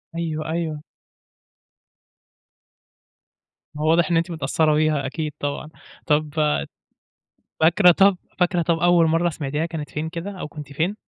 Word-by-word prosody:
أيوه، 155 Hz, -2 st, -3 dB
أيوه. 160 Hz, -2 st, -3 dB, 3.0 s
هو 155 Hz, +1 st, 0 dB
واضح 165 Hz, -1 st, +3 dB
إن 170 Hz, -, +3 dB
أنتِ 170 Hz, +2 st, -1 dB
متأثرة 155 Hz, 0 st, +1 dB
بيها، 155 Hz, -2 st, +1 dB
أكيد 150 Hz, +2 st, -4 dB
طبعًا. 145 Hz, +1 st, -4 dB, 0.4 s
طَب 150 Hz, -1 st, +1 dB, 1.3 s
فاكرة 175 Hz, +3 st, +6 dB
طَب 195 Hz, +2 st, +4 dB, 0.2 s
فاكرة 180 Hz, -1 st, +2 dB
طَب، 165 Hz, 0 st, 0 dB
أول 175 Hz, -1 st, +4 dB
مرة 165 Hz, +2 st, +2 dB
سمعتيها 150 Hz, 0 st, -3 dB
كانت 160 Hz, -4 st, -6 dB
فين 155 Hz, +4 st, -4 dB
كده، 170 Hz, +4 st, -6 dB
أو -, -, -4 dB
كنتِ 150 Hz, -2 st, -10 dB
فين؟ 165 Hz, +8 st, -1 dB
160 Hz, 130 wpm, -22 LUFS, 150-170 Hz, 3.0 s, فاكرة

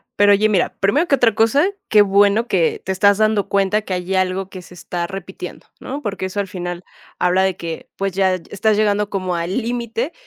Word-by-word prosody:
Pero 205 Hz, 0 st, +5 dB
oye, 210 Hz, +2 st, +3 dB
mira, 195 Hz, -4 st, +1 dB
primero 280 Hz, -, +2 dB
que 275 Hz, -, +4 dB
otra 235 Hz, -4 st, +3 dB
cosa. 230 Hz, -, +3 dB, 0.2 s
Que 210 Hz, -1 st, +6 dB
bueno 205 Hz, +3 st, +3 dB
que 175 Hz, -7 st, +1 dB
te 190 Hz, -, -2 dB
estás 200 Hz, +1 st, +3 dB
dando 215 Hz, -2 st, +1 dB
cuenta 200 Hz, +2 st, +1 dB
que 195 Hz, -, -5 dB
hay 180 Hz, +1 st, -3 dB
algo 185 Hz, 0 st, 0 dB
que 185 Hz, -1 st, -9 dB
se 180 Hz, -, -15 dB
está 175 Hz, 0 st, -4 dB
repitiendo, 190 Hz, -1 st, -8 dB
¿no? 280 Hz, +3 st, -6 dB
Porque 200 Hz, -4 st, -4 dB
eso 190 Hz, +2 st, -4 dB
al 200 Hz, -, -1 dB
final 175 Hz, -1 st, -6 dB, 0.4 s
habla 180 Hz, +1 st, +2 dB
de 190 Hz, -1 st, +1 dB
que, 165 Hz, -1 st, -7 dB
pues, 195 Hz, -1 st, -2 dB
ya 190 Hz, -1 st, +2 dB
estás 205 Hz, +4 st, -1 dB
llegando 210 Hz, -1 st, +1 dB
como 185 Hz, -3 st, -2 dB
al 170 Hz, +5 st, -2 dB
límite, 235 Hz, +3 st, -3 dB
195 Hz, 210 wpm, -19 LUFS, 185-215 Hz, 0.4 s, Que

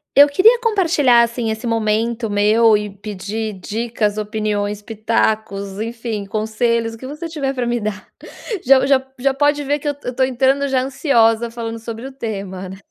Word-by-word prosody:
Eu 285 Hz, +1 st, +9 dB
queria 435 Hz, +11 st, +5 dB
compartilhar, 330 Hz, -, +4 dB
assim, 235 Hz, -1 st, -2 dB
esse 220 Hz, +2 st, -4 dB
momento 225 Hz, 0 st, 0 dB
meu 210 Hz, +2 st, +4 dB
e 210 Hz, 0 st, -4 dB
pedir 210 Hz, +2 st, -5 dB
dicas, 215 Hz, +2 st, -2 dB
opiniões, 210 Hz, -1 st, -2 dB
pitacos, 215 Hz, -2 st, -1 dB
enfim, 225 Hz, -2 st, -4 dB
conselhos 225 Hz, +2 st, -1 dB
o -, -, -10 dB
que 260 Hz, -, -8 dB
você 300 Hz, +5 st, -6 dB
tiver 290 Hz, -5 st, -2 dB
pra 250 Hz, -1 st, -1 dB
me 240 Hz, 0 st, 0 dB
dar, 210 Hz, -1 st, -5 dB, 0.6 s
já 265 Hz, +1 st, +6 dB
já 270 Hz, -1 st, +3 dB, 0.2 s
já 270 Hz, +2 st, +1 dB
pode 290 Hz, +1 st, +1 dB
ver 290 Hz, +1 st, 0 dB
que 295 Hz, -, -6 dB
eu 290 Hz, -, 0 dB
eu 250 Hz, -, -3 dB
estou 260 Hz, +1 st, +1 dB
entrando 265 Hz, +2 st, +1 dB
já 265 Hz, -2 st, +1 dB
ansiosa 235 Hz, -4 st, +2 dB
falando 230 Hz, -1 st, -5 dB
sobre 225 Hz, +2 st, -7 dB
o 270 Hz, -, -7 dB
tema, 195 Hz, -7 st, -5 dB
né? 190 Hz, +1 st, -9 dB
230 Hz, 175 wpm, -19 LUFS, 215-265 Hz, 0.6 s, Eu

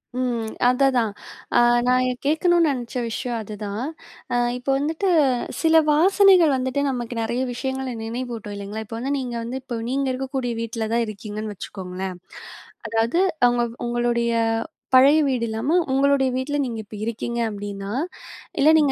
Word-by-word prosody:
ம். 240 Hz, -3 st, -1 dB, 0.2 s
அதைதான். 250 Hz, -3 st, +3 dB, 0.5 s
அ -, -, +7 dB, 0.3 s
நான் 255 Hz, 0 st, +3 dB
எ -, -, +1 dB
கேட்கணும்ன்னு 330 Hz, +2 st, +3 dB
நினைச்ச 245 Hz, 0 st, -5 dB
விஷயம் 235 Hz, +1 st, -3 dB
அது 210 Hz, 0 st, -7 dB
தான். 205 Hz, +4 st, -4 dB, 0.5 s
அ -, -, +2 dB, 0.2 s
இப்ப 250 Hz, +2 st, -6 dB
வந்துட்டு 320 Hz, +7 st, -1 dB, 0.5 s
சில 320 Hz, -1 st, +5 dB
வாசனைகள் 365 Hz, 0 st, +5 dB
வந்துட்டு 260 Hz, +2 st, -1 dB
நமக்கு 245 Hz, -2 st, -4 dB
நிறைய 235 Hz, +3 st, -1 dB
விஷயங்கள 265 Hz, 0 st, -3 dB
நினைவூட்டும். 230 Hz, -3 st, -5 dB
இல்லைங்களா! 205 Hz, +2 st, -5 dB
இப்ப 225 Hz, +2 st, -7 dB
வந்து 270 Hz, +3 st, -2 dB
நீங்க 245 Hz, -2 st, -4 dB
வந்து 255 Hz, +3 st, -4 dB
இப்ப 240 Hz, -3 st, -4 dB
நீங்க 275 Hz, +1 st, 0 dB
இருக்கக்கூடிய 260 Hz, -1 st, -3 dB
வீட்ல 230 Hz, -1 st, -3 dB
தான் 235 Hz, 0 st, +2 dB
இருக்கீங்கன்னு 215 Hz, 0 st, -6 dB
வச்சுக்கோங்களேன். 185 Hz, -1 st, -6 dB, 0.7 s
அதாவது 225 Hz, +9 st, +1 dB, 0.3 s
அவுங்க 240 Hz, 0 st, +3 dB, 0.2 s
உங்களுடைய 240 Hz, -1 st, 0 dB, 0.6 s
பழைய 280 Hz, +4 st, +7 dB
வீடு 250 Hz, -3 st, 0 dB
இல்லாம, 225 Hz, +7 st, -2 dB, 0.2 s
உங்களுடைய 270 Hz, 0 st, +3 dB
வீட்ல 285 Hz, +3 st, -1 dB
நீங்க 230 Hz, -3 st, -4 dB
இப்ப 210 Hz, +1 st, -11 dB
இருக்கீங்க. 235 Hz, +1 st, -3 dB
அப்பிடின்னா, 200 Hz, -1 st, -6 dB, 0.7 s
இல்ல 295 Hz, +3 st, +6 dB
நீங்க 295 Hz, -3 st, +3 dB
245 Hz, 145 wpm, -23 LUFS, 225-270 Hz, 0.7 s, அ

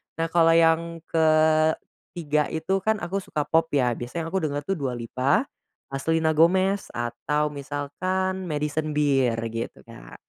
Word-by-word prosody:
Nah 165 Hz, +1 st, -1 dB
kalau 165 Hz, -1 st, +5 dB
yang 165 Hz, 0 st, +2 dB
ketiga 155 Hz, -1 st, +1 dB
itu 165 Hz, +5 st, -1 dB
kan 220 Hz, +3 st, +1 dB
aku 185 Hz, +3 st, -2 dB
suka 155 Hz, -5 st, -3 dB
pop 160 Hz, +2 st, +2 dB
ya, 125 Hz, -3 st, +3 dB
biasanya 160 Hz, +8 st, -5 dB
aku 190 Hz, -, +1 dB
denger 145 Hz, -3 st, -2 dB
tuh 190 Hz, +3 st, -2 dB
Dua 130 Hz, -3 st, -2 dB
Lipa, 130 Hz, -, 0 dB, 0.6 s
Selena 160 Hz, +1 st, +1 dB
Gomez 185 Hz, +5 st, +3 dB
atau 150 Hz, +5 st, -1 dB
misalkan 185 Hz, +7 st, -3 dB
Madison 150 Hz, 0 st, -2 dB
Beer 135 Hz, -5 st, +2 dB, 0.2 s
gitu 115 Hz, 0 st, -6 dB
Kak. -, -, -13 dB
155 Hz, 140 wpm, -25 LUFS, 145-170 Hz, 0.6 s, kalau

